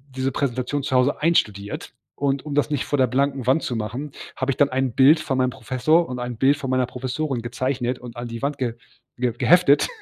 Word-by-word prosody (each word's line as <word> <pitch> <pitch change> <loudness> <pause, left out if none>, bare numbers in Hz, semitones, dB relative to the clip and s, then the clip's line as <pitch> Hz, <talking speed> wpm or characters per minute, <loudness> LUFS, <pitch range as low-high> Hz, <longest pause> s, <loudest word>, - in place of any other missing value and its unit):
diese 130 0 -1
Präsentation 130 +1 -2
zu 135 -1 -2
Hause 130 +4 +2
einstudiert, 105 -11 0 0.2
und 140 -1 -1
um 150 - -5
das 145 +1 +2
nicht 145 - 0
vor 145 - -1
der 130 - +4
blanken 135 +1 0
Wand 135 +5 +3
zu 125 - -2
machen, 125 +7 -4 0.2
habe 130 +1 -1
ich 130 - -5
dann 145 - +5
ein 130 -1 0
Bild 140 +6 +6
von 135 -3 -2
meinem 130 -1 +2
Professor 145 +9 +1
und 125 -1 -4
ein 120 -1 -4
Bild 135 +4 +3
von 135 -3 -5
meiner 130 -1 +2
Professorin 130 +1 -3
gezeichnet 125 +1 -2
und 120 -1 -10
an 120 0 -5
die 115 +1 -7
Wand 140 0 -2
geh 125 -4 -2 0.4
ge 120 -2 0
geheftet. 175 -4 +5
130 Hz, 220 wpm, -23 LUFS, 125-140 Hz, 0.4 s, Bild